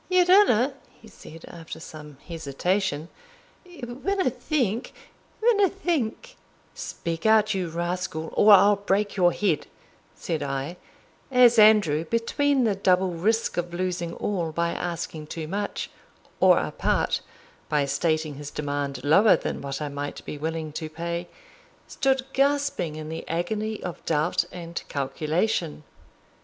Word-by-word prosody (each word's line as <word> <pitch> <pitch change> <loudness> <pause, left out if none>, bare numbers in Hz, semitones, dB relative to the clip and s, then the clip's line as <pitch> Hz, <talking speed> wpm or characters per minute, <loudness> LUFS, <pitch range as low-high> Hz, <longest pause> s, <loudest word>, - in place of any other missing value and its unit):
"Your 365 -1 +4
honour," 320 - +5 0.3
he 225 - -15
said, 165 -6 -13
after 165 -2 -9
some 150 -3 -11
hesitation, 165 +1 -1 0.8
"wunna 320 +6 -1
think 245 -2 -1 0.5
wunna 410 -5 +4
think" 335 - -2 0.4
"Speak 165 +4 -4
out, 215 -1 +4
you 185 -3 -2
rascal, 170 -1 -3
or 210 - +6
I'll 200 +1 +7
break 200 +1 0
your 175 -3 +4
head," 180 -5 0 0.5
said 160 -3 -3
I, 140 +4 -3 0.5
as 245 -3 +6
Andrew, 210 -8 +5
between 255 - +1
the 220 -3 +2
double 190 -1 +2
risk 220 +7 0
of 175 0 -2
losing 175 -2 -2
all 175 -6 -2
by 170 +2 0
asking 170 -3 -4
too 160 0 -5
much, 200 +4 -3 0.5
or - - +6
a - - -1
part, - - 0 0.5
by 150 -2 +2
stating 155 +2 0
his 145 0 -7
demand 145 -3 -3
lower 195 +9 +6
than - - -4
what 140 +1 -4
I - - -2
might 145 0 -6
be - - -5
willing 160 +1 -4
to 155 +1 -5
pay, 170 +2 -4 0.6
stood 265 -1 0
gasping 280 - +1
in 155 0 -7
the 160 - -5
agony 210 +6 -2
of 175 - -6
doubt 170 +3 +1
and 170 -1 -6
calculation. 155 +5 -1
175 Hz, 135 wpm, -25 LUFS, 155-220 Hz, 0.8 s, I'll